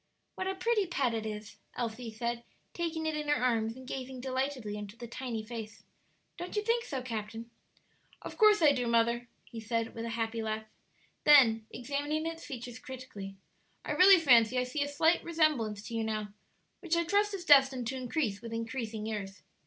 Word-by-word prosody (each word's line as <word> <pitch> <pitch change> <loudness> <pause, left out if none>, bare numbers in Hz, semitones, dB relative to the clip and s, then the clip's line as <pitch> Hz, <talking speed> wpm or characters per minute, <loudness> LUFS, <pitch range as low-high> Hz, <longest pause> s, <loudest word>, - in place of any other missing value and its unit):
"What 375 - -4
a 385 - -1
pretty 420 0 +1
pet 270 -8 0
it 220 -1 -2
is!" 210 -1 -7 0.2
Elsie 235 0 -4
said, 235 +2 -3 0.3
taking 330 -2 -2
it 315 -1 -1
in 300 0 -3
her 295 - +3
arms 230 -3 +1
and 260 0 -11
gazing 260 -1 -5
delightedly 260 -4 -2
into 210 +1 -8
the 240 - -7
tiny 235 -2 -5
face. 220 -2 -8 0.5
"Don't 350 +3 -6
you 420 - 0
think 465 +1 +1
so, 265 -4 -4
captain?" 225 -1 -5 0.7
"Of - - -7
course 425 -5 +5
I 295 - +8
do, 250 -3 -1
mother," 235 +1 +2 0.2
he 230 - -9
said, 225 +1 -2
with 230 - -5
a - - -3
happy 225 0 -1
laugh. 220 0 -3 0.6
Then, 230 -7 +6
examining 290 +5 -2
its 330 0 -5
features 245 -3 -7
critically: 245 -7 -8 0.5
"I - - -3
really 380 +1 +8
fancy 250 -5 +5
I 250 - +3
see 250 +4 -3
a 285 - +1
slight 320 +4 +2
resemblance 295 -11 +1
to 235 - -8
you 225 -1 0
now, 215 -1 -2 0.5
which 345 -3 0
I 340 - +2
trust 405 +4 +1
is 365 -2 -7
destined 270 -4 +6
to 265 - -3
increase 250 -4 -2
with 230 -1 -7
increasing 230 -2 -4
years. 205 -3 -5
250 Hz, 190 wpm, -31 LUFS, 225-300 Hz, 0.7 s, I